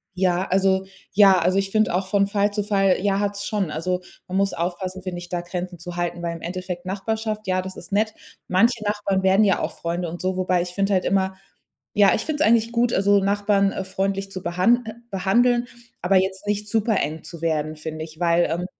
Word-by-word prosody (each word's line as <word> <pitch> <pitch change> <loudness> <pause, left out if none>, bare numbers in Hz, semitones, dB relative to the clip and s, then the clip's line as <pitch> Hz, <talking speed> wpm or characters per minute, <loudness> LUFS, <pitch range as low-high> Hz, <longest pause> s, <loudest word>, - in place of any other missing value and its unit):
Ja, 180 -1 +1
also 190 0 +2 0.3
ja, 195 -2 +6
also 185 +3 +2
ich 195 - -1
finde 215 -4 +2
auch 185 +1 0
von 200 0 +2
Fall 205 0 +1
zu 210 0 -1
Fall, 195 -2 +2
ja, 195 -1 +1
hat 205 0 -1
es 200 - -5
schon. 205 -5 -1
Also, 180 +4 -2 0.3
man 185 +1 -2
muss 195 -1 +1
aufpassen, 185 +2 -4
finde 180 -2 -4
ich, 175 0 -10
da 175 -1 -2
Grenzen 175 0 -5
zu 175 0 -7
halten, 175 0 -2
weil 170 0 -2
im 165 - -10
Endeffekt 180 0 -5
Nachbarschaft. 215 +2 -3
Ja, 185 0 +1
das 190 0 -8
ist 175 - -11
nett. 215 +2 +1 0.3
Manche 220 +4 +2
Nachbarn 205 -2 0
werden 190 +3 +5
ja 195 -3 +3
auch - - -4
Freunde 170 0 -2
und 175 +1 -7
so. 185 0 -1
Wobei 185 -1 +1
ich 180 - -6
finde 195 +2 0
halt 185 - +1
immer 190 0 +1 0.6
ja, 200 -2 +6
ich - - -2
finde 305 -1 -1
es - - +4
eigentlich 230 0 +3
gut, 235 0 +1
also 200 +1 +4
Nachbarn, 200 0 +2
äh, 190 - -3
freundlich 195 +1 -2
zu 185 - -7
behan 185 +8 +2
äh, 220 - -5 0.2
behandeln, 240 +6 +2 0.4
aber 190 +2 +3
jetzt 190 +2 -1
nicht 210 0 -1
supereng 200 -9 0
zu 170 -2 -10
werden, 155 -2 -1
finde 155 0 -6
ich. 155 0 -15
Weil, 170 0 +3
ähm, 175 +2 -2
190 Hz, 225 wpm, -23 LUFS, 180-205 Hz, 0.6 s, ja